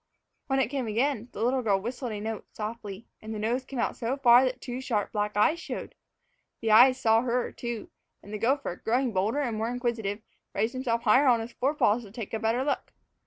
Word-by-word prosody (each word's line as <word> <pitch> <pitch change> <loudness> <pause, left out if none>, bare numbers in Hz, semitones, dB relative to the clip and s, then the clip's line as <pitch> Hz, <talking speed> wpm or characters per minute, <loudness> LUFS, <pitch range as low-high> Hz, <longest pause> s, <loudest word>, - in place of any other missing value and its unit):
When 270 -2 +1
it 250 -4 +1
came 270 -3 -2
again, 235 +1 0
the 215 - -4
little 255 +2 +2
girl 200 -5 +2
whistled 240 +3 -4
a 210 - -4
note 220 +1 -5
softly, 215 -1 -6 0.2
and 220 0 -6
the - - -4
nose 240 +4 -1
came 275 0 -7
out - - 0
so 240 +4 -2
far 245 -2 +7
that 255 0 -2
two 250 0 -5
sharp 230 -6 -1
black 210 -1 -2
eyes 310 +11 +3
showed. - - -6 0.7
The 225 -1 +1
eyes 255 +4 +7
saw 225 0 +4
her, 250 0 -1
too, 235 -2 -6 0.3
and 205 - -10
the 210 - -3
gopher, 260 -5 0
growing 245 +1 0
bolder 210 +9 +1
and 240 -6 -1
more 225 +1 -1
inquisitive, 230 -4 -2 0.3
raised 225 +2 0
himself 240 -3 -1
higher 255 +6 +5
on 240 -2 +5
his 225 +2 -6
fore 275 +4 0
paws 230 -4 +3
to 215 - -12
take 225 0 -7
a 225 - -1
better 230 +3 +1
look. 285 - -2
235 Hz, 220 wpm, -28 LUFS, 220-255 Hz, 0.7 s, far